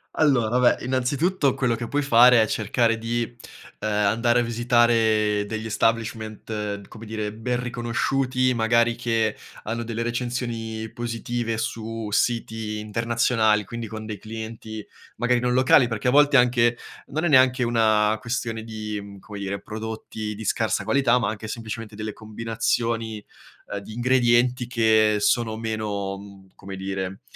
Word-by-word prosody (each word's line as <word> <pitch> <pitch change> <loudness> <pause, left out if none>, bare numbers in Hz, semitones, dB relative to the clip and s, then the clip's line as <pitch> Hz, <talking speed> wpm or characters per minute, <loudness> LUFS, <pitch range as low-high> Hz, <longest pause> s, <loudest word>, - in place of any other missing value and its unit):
Allora, 125 -6 +3
vabbè, 125 -1 +3
innanzitutto 135 +5 +1
quello 125 -3 0
che 115 +1 -5
puoi 145 +4 0
fare 125 -3 +6
è - - +4
cercare 115 +2 +1
di, 115 +1 -1 0.6
uhm, - - -3
andare 110 +3 +2
a - - 0
visitare 115 -3 +2
degli 110 +1 -4
establishment, 110 -2 -2
come 110 +1 -11
dire, 110 -1 -4
ben 120 +3 -2
riconosciuti, 125 +2 0
magari 115 0 +2
che 115 -2 0 0.3
hanno 115 +2 -3
delle 115 0 -3
recensioni 120 -2 -3
positive 120 -1 -3
su 115 -1 -4
siti 110 -1 -1
internazionali, 110 0 +1
quindi 115 +3 -6
con 110 0 -7
dei 110 -1 -5
clienti 110 0 -7 0.3
magari 120 +1 +1
non 125 0 0
locali, 130 -1 +5
perché 115 +2 -1
a - - +3
volte 145 +1 +5
anche 120 -2 +4 0.3
non 155 +4 -3
è 175 - +2
neanche 130 -2 +5
una 110 -2 +3
questione 115 0 -3
di, 110 -2 -5
mhmm, 100 -1 -11
come 105 +1 -9
dire, 100 0 -4
prodotti 110 0 -6
di 110 - -7
scarsa - - 0
qualità, 135 -3 +3
ma 100 - 0
anche 110 0 -6
semplicemente 115 -1 -6
delle 110 0 -4
combinazioni, 115 0 -2 0.5
uhm, - - -2
di 100 +2 -10
ingredienti 125 0 +2
che 110 -3 +3
sono 115 0 +2
meno, 105 -3 -3
mhmm, 100 -1 -14
come 95 0 -9
dire, 95 0 -4
115 Hz, 145 wpm, -24 LUFS, 110-120 Hz, 0.6 s, fare